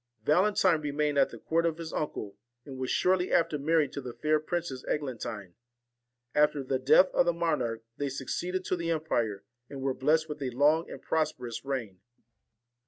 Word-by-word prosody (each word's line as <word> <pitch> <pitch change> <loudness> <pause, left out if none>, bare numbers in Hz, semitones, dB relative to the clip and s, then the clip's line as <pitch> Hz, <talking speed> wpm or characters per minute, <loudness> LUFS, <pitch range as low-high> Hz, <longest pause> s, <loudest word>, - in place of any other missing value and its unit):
Valentine 185 0 +3
remained 150 0 0
at 135 - +4
the - - -10
court 165 +1 0
of 165 -1 0
his 165 -1 -7
uncle, 105 -9 -3 0.3
and 135 -2 -8
was 130 - -2
shortly 185 0 +2
after 165 -3 +2
married 155 -1 +2
to 140 - -5
the 125 -2 -7
fair 155 0 +2
Princess 155 -4 -3
Eglantine. 115 -9 -4 0.8
At 150 0 +4
the 135 -2 -2
death 140 +8 +5
of 175 - +3
the 175 - +3
monarch 140 -10 -1
they 145 -1 -1
succeeded 180 +8 -3
to 185 - 0
the 170 -1 -3
empire, 120 -11 -1 0.3
and 140 - -7
were 135 -1 +1
blessed 155 +5 +2
with 150 -1 -7
a 135 - -1
long 150 +6 +2
and - - -8
prosperous 150 -7 -2
reign. 120 -9 -4
150 Hz, 175 wpm, -29 LUFS, 130-165 Hz, 0.8 s, death